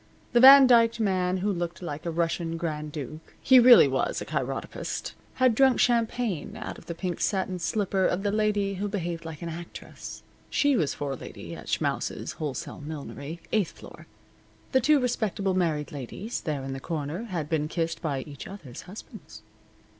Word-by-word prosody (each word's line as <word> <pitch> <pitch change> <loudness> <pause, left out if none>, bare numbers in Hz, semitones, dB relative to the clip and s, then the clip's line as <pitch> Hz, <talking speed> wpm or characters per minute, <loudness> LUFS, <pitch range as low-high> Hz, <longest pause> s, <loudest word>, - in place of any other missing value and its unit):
The 240 - +5
Van 270 +1 +10
Dyked 230 -2 +5
man 185 -3 +1
who 205 - +2
looked 175 -1 -4
like 155 -2 -6
a - - 0
Russian 165 0 -1
Grand 155 -3 -4
Duke 155 +2 -8
(he 260 -1 +7
really 240 - +9
was 135 -1 -1
a - - -5
chiropodist) - - -4 0.2
had 255 -2 +4
drunk 265 +2 +4
champagne 230 -5 0
out 215 - -6
of - - -18
the 170 - -4
pink 180 0 -3
satin 190 -2 0
slipper 195 +1 +1
of 185 +2 -1
the 205 - +1
lady 205 -2 +1
who 200 +2 -3
behaved 175 -4 -4
like 160 0 -7
an 170 - -4
actress 170 +1 -9 0.3
(she 285 -1 +3
was 155 - 0
forelady 140 -3 -6
at - - -11
Schmaus' - - -1
Wholesale 150 0 -5
Millinery, 150 +1 -7
eighth 210 -5 +1
floor). - - -13 0.6
The 260 - +4
two 295 +3 +4
respectable 215 -6 -1
married 160 -5 0
ladies 150 - -5
there 145 -4 -3
in 135 0 -4
the 135 - -5
corner 155 - -4
had 175 -9 -3
been 150 -1 0
kissed 165 0 -2
by 145 -6 -2
each 140 -1 -9
other's 155 -11 -9
husbands. 205 - -11
175 Hz, 175 wpm, -27 LUFS, 155-215 Hz, 0.6 s, Van